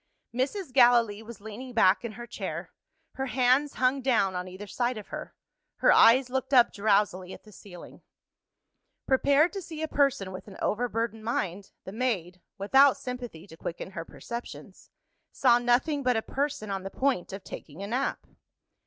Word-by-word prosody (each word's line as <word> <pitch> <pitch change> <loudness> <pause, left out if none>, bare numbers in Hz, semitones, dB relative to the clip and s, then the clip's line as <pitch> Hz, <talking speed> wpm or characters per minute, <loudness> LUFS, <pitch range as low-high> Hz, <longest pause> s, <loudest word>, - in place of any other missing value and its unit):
Mrs. 270 - -2
Gallilee 240 -4 +5
was 225 -2 -11
leaning 225 +4 -8
back 200 -3 +4
in 235 -2 -5
her 240 +2 -8
chair: - - -6 0.4
her 265 0 -3
hands 255 +4 +2
hung 260 +2 +1
down 230 -7 +2
on 180 0 -4
either 185 +3 -9
side 240 +3 -2
of 210 - -9
her; - - -7 0.4
her - - +4
eyes 250 +2 +6
looked 265 +1 -1
up 245 -2 +6
drowsily 200 -3 +1
at - - -12
the 215 - -16
ceiling. 185 -3 -13 1.0
Prepared 280 +6 +3
to 395 - -4
see 320 -3 -7
a - - -1
person 275 -11 +1
with 185 - -9
an 195 - -11
overburdened 225 0 -2
mind, 200 -4 -3 0.2
the 190 - -7
maid 190 -7 -2 0.2
(without 270 +7 +5
sympathy, 245 -10 -7
to 160 - -13
quicken 170 +3 -6
her 165 -3 -5
perceptions) 235 +7 -9 0.4
saw 240 - +4
nothing 250 +5 +1
but 250 -3 +2
a 220 - -1
person 275 -7 -3
on 195 -1 -2
the 195 - -6
point 260 -7 -1
of 195 0 -7
taking 160 +6 -9
a - - -3
nap. 255 +5 -2
235 Hz, 170 wpm, -28 LUFS, 200-260 Hz, 1.0 s, eyes